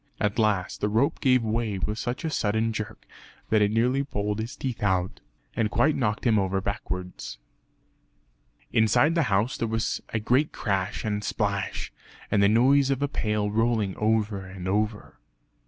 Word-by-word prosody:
At 105 Hz, +2 st, 0 dB
last 105 Hz, -4 st, +1 dB
the 105 Hz, -, +1 dB
rope 115 Hz, +7 st, +1 dB
gave 125 Hz, -2 st, +3 dB
way 110 Hz, -2 st, -1 dB
with 105 Hz, +4 st, -2 dB
such 120 Hz, +6 st, -3 dB
a 160 Hz, -, -1 dB
sudden 110 Hz, -1 st, 0 dB
jerk 105 Hz, -1 st, -6 dB, 0.4 s
that 110 Hz, -1 st, +3 dB
it 105 Hz, -, +4 dB
nearly 125 Hz, +5 st, +2 dB
pulled 105 Hz, -5 st, -2 dB
his 115 Hz, +3 st, -4 dB
teeth 130 Hz, -3 st, -4 dB
out, 95 Hz, -3 st, 0 dB, 0.4 s
and 110 Hz, -2 st, +1 dB
quite 140 Hz, +8 st, +2 dB
knocked 110 Hz, -4 st, -1 dB
him 110 Hz, -3 st, +4 dB
over 95 Hz, 0 st, 0 dB
backwards. 90 Hz, -8 st, -5 dB, 1.4 s
Inside 110 Hz, +8 st, +4 dB
the 165 Hz, -, +2 dB
house 105 Hz, +6 st, +1 dB
there 115 Hz, -, -1 dB
was 110 Hz, 0 st, -1 dB
a 115 Hz, -, -1 dB
great 125 Hz, +7 st, +2 dB
crash 100 Hz, -1 st, -2 dB
and 105 Hz, -1 st, -1 dB
splash, 100 Hz, -2 st, -2 dB, 0.4 s
and 100 Hz, -, +3 dB
the 100 Hz, -, +5 dB
noise 135 Hz, +5 st, +4 dB
of 135 Hz, 0 st, 0 dB
a -, -, +2 dB
pail 105 Hz, -6 st, -1 dB
rolling 110 Hz, -3 st, +1 dB
over 105 Hz, -2 st, 0 dB
and 95 Hz, -1 st, -8 dB
over. 105 Hz, +2 st, -2 dB
110 Hz, 170 wpm, -26 LUFS, 100-120 Hz, 1.4 s, the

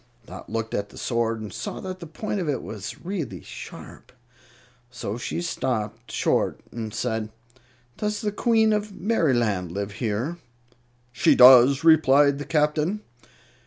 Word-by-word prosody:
Dot -, -, -11 dB
looked 115 Hz, 0 st, -3 dB
at 100 Hz, 0 st, -2 dB
the -, -, -15 dB
sword 115 Hz, -2 st, -1 dB
and 105 Hz, -, -7 dB
saw 120 Hz, -, -5 dB
that 185 Hz, -1 st, -6 dB
the 170 Hz, -, -8 dB
point 205 Hz, +6 st, -4 dB
of 170 Hz, -5 st, -2 dB
it 135 Hz, -4 st, -2 dB
was 105 Hz, -, -8 dB
really 160 Hz, -, -4 dB
sharp. -, -, -11 dB, 0.8 s
So 120 Hz, -4 st, -5 dB
she 125 Hz, +8 st, -4 dB
stopped 115 Hz, -7 st, -3 dB
short -, -, 0 dB
and 110 Hz, -2 st, -5 dB
said, 110 Hz, -1 st, -2 dB, 0.7 s
"Does 210 Hz, 0 st, -2 dB
the 210 Hz, -, -1 dB
Queen 220 Hz, 0 st, +3 dB
of 210 Hz, 0 st, -2 dB
Merryland 120 Hz, -, +1 dB
live 100 Hz, +2 st, -4 dB
here?" 115 Hz, +9 st, -3 dB, 0.7 s
"She 120 Hz, -, +3 dB
does," 130 Hz, +2 st, +8 dB
replied 145 Hz, -3 st, +5 dB
the 145 Hz, -, -5 dB
Captain. 150 Hz, +6 st, 0 dB
130 Hz, 145 wpm, -24 LUFS, 110-170 Hz, 0.8 s, does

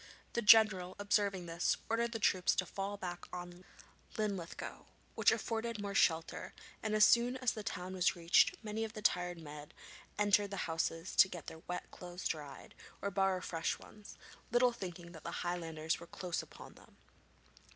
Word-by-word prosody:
The 235 Hz, -, 0 dB
general, 210 Hz, -5 st, +6 dB
observing 200 Hz, -2 st, +1 dB
this, 170 Hz, +1 st, 0 dB
ordered 235 Hz, +1 st, 0 dB
the 230 Hz, -, -2 dB
troops 185 Hz, -4 st, +2 dB
to 185 Hz, -, +1 dB
fall 195 Hz, +2 st, -4 dB
back 175 Hz, -2 st, -5 dB
on 175 Hz, 0 st, -8 dB, 0.5 s
Linlithgow, 200 Hz, -6 st, -4 dB, 0.3 s
which -, -, +4 dB
afforded 230 Hz, -1 st, -2 dB
more 200 Hz, -1 st, -4 dB
shelter, 165 Hz, -4 st, +1 dB, 0.3 s
and 215 Hz, 0 st, -1 dB
as 210 Hz, 0 st, +8 dB
soon 245 Hz, +2 st, +4 dB
as 255 Hz, -2 st, +1 dB
the 215 Hz, -, -5 dB
town 185 Hz, -2 st, -5 dB
was 185 Hz, 0 st, +2 dB
reached 170 Hz, -1 st, +4 dB
many 215 Hz, +1 st, -2 dB
of 220 Hz, -1 st, -5 dB
the 215 Hz, -, -8 dB
tired 180 Hz, -3 st, +1 dB
men 150 Hz, -1 st, -9 dB, 0.5 s
entered 205 Hz, 0 st, +3 dB
the 195 Hz, -, -5 dB
houses 165 Hz, +1 st, -2 dB
to 190 Hz, -, +8 dB
get 175 Hz, -4 st, -7 dB
their 160 Hz, -, -9 dB
wet 180 Hz, 0 st, -5 dB
clothes 180 Hz, 0 st, -5 dB
dried, 145 Hz, -3 st, -6 dB, 0.3 s
or 200 Hz, -, -2 dB
borrow 195 Hz, -1 st, +1 dB
fresh 165 Hz, -2 st, -2 dB
ones, 210 Hz, -1 st, -13 dB, 0.3 s
little 245 Hz, +1 st, +5 dB
thinking 175 Hz, -6 st, -7 dB
that 165 Hz, -3 st, -12 dB
the -, -, -4 dB
Highlanders 165 Hz, -2 st, -2 dB
were 170 Hz, -, -11 dB
close 175 Hz, -2 st, -3 dB
upon -, -, -12 dB
them. -, -, -19 dB
185 Hz, 170 wpm, -35 LUFS, 175-210 Hz, 0.5 s, as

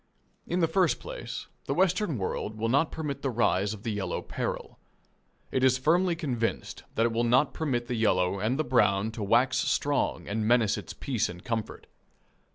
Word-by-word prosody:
In 180 Hz, +1 st, 0 dB
the 165 Hz, -, +4 dB
first 180 Hz, +1 st, +2 dB
place, -, -, -6 dB, 0.2 s
the -, -, -1 dB
Western 185 Hz, -, +2 dB
world 105 Hz, +2 st, -3 dB
will 115 Hz, +1 st, -1 dB
not 140 Hz, +6 st, +2 dB
permit 150 Hz, -3 st, -4 dB
the 135 Hz, -, -1 dB
rise 100 Hz, -4 st, +1 dB
of 110 Hz, -1 st, -7 dB
the 115 Hz, -, -2 dB
yellow 100 Hz, -4 st, -2 dB
peril. -, -, -4 dB, 0.7 s
It 130 Hz, -, 0 dB
is 130 Hz, -1 st, +5 dB
firmly 170 Hz, +6 st, +2 dB
convinced 125 Hz, -9 st, -2 dB
that 115 Hz, -, +3 dB
it 115 Hz, -, +1 dB
will 115 Hz, +1 st, 0 dB
not 125 Hz, +5 st, +3 dB
permit 130 Hz, -7 st, -1 dB
the 125 Hz, -, -3 dB
yellow 95 Hz, -4 st, +2 dB
and 115 Hz, +7 st, 0 dB
the 155 Hz, -, +1 dB
brown 110 Hz, -5 st, +2 dB
to 115 Hz, 0 st, -7 dB
wax 120 Hz, +6 st, +3 dB
strong 145 Hz, -1 st, 0 dB
and 110 Hz, +1 st, -1 dB
menace 115 Hz, -3 st, +4 dB
its -, -, -7 dB
peace 125 Hz, -6 st, -1 dB
and 90 Hz, +1 st, -9 dB
comfort. 115 Hz, -3 st, -4 dB
120 Hz, 185 wpm, -28 LUFS, 110-145 Hz, 0.7 s, is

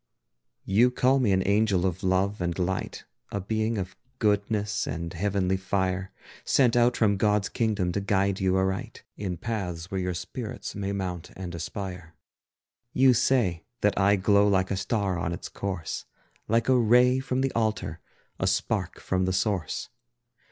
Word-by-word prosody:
You 110 Hz, +6 st, +4 dB
call 130 Hz, +2 st, +3 dB
me 120 Hz, -6 st, +2 dB
an 95 Hz, 0 st, +1 dB
angel 100 Hz, -3 st, +2 dB
of 95 Hz, -1 st, -1 dB
love 95 Hz, +2 st, +1 dB
and 85 Hz, -1 st, -1 dB
of 90 Hz, -, +1 dB
light, 95 Hz, +1 st, -4 dB, 0.3 s
A 100 Hz, -, -2 dB
being 110 Hz, +3 st, -1 dB
of 95 Hz, -1 st, -4 dB, 0.2 s
goodness 105 Hz, -1 st, 0 dB
and 85 Hz, +1 st, -4 dB
heavenly 95 Hz, +1 st, 0 dB
fire, 95 Hz, 0 st, -1 dB, 0.3 s
Sent 125 Hz, -4 st, +3 dB
out 120 Hz, 0 st, +4 dB
from 100 Hz, -3 st, +3 dB
God's 105 Hz, 0 st, +2 dB
kingdom 105 Hz, -6 st, 0 dB
to 100 Hz, -, -1 dB
guide 100 Hz, -1 st, +1 dB
you 95 Hz, -1 st, +2 dB
aright, 95 Hz, 0 st, -2 dB
In 95 Hz, -4 st, -4 dB
paths 90 Hz, -5 st, -4 dB
where 95 Hz, -, -1 dB
your 90 Hz, -1 st, -2 dB
spirits 105 Hz, +6 st, -6 dB
may 100 Hz, -1 st, -3 dB
mount 90 Hz, -4 st, -4 dB
and 90 Hz, -2 st, -6 dB
aspire. 90 Hz, -1 st, -6 dB, 0.8 s
You 130 Hz, 0 st, +5 dB
say 110 Hz, -9 st, +2 dB, 0.2 s
that 105 Hz, -, +3 dB
I 100 Hz, +1 st, +4 dB
glow 100 Hz, +1 st, +4 dB
like 95 Hz, -1 st, +2 dB
a -, -, +1 dB
star 95 Hz, -2 st, -1 dB
on 85 Hz, 0 st, -2 dB
its 85 Hz, -, -6 dB
course, 95 Hz, -5 st, -4 dB, 0.4 s
Like 115 Hz, +1 st, +2 dB
a 130 Hz, -, +5 dB
ray 125 Hz, +2 st, +5 dB
from 130 Hz, 0 st, -1 dB
the 135 Hz, 0 st, +1 dB
altar, 110 Hz, -7 st, -1 dB, 0.4 s
a -, -, +1 dB
spark -, -, -1 dB
from 95 Hz, 0 st, 0 dB
the 95 Hz, -, 0 dB
source. 95 Hz, -4 st, -1 dB
100 Hz, 165 wpm, -27 LUFS, 95-110 Hz, 0.8 s, You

